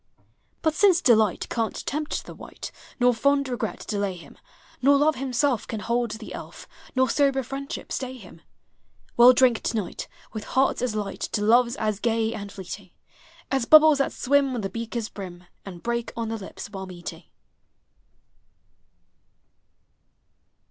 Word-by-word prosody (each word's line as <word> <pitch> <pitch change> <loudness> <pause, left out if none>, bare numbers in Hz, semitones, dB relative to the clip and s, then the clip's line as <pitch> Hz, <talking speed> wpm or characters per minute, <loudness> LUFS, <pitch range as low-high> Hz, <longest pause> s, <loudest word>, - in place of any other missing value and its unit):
But 315 -2 +2
since 370 +1 +5
Delight 220 - +3
can't 225 -2 -2
tempt 300 +2 -3
the - - -9
wight, - - -9 0.3
Nor 245 0 +5
fond 280 +4 +2
Regret 245 -2 -4
delay 200 -3 -1
him, 175 - -13 0.5
Nor 280 +2 +5
Love 295 0 +3
himself 260 -1 0
can 220 - -4
hold 235 +3 0
the 220 +1 -7
elf. - - -9 0.3
Nor 260 0 +4
sober 270 +1 +2
Friendship 275 +3 -6
stay 260 -1 -4
him, 180 -7 -14 0.7
Well 240 +1 +9
drink 250 -2 +4
to 225 - -1
night, 205 - -4 0.3
with 215 -2 -5
hearts 265 -1 +1
as 245 -4 -1
light, 205 -2 -3
To 205 - 0
loves 240 +3 +4
as 215 -4 -1
gag 225 -1 0
and 200 -1 -6
fleeting 190 0 -8 0.6
As 270 -3 +1
bubbles 310 +1 +7
that 275 - +1
swim 275 0 +2
on 235 - -2
the 195 - -4
beaker's 230 -1 -4
brim, 180 -4 -9 0.2
And 175 -3 -9
break 235 0 -2
on 230 -1 -2
the 225 - -2
lips 200 +1 -9
while 190 -2 -6
meeting. 175 -2 -8
235 Hz, 155 wpm, -25 LUFS, 210-270 Hz, 0.7 s, Well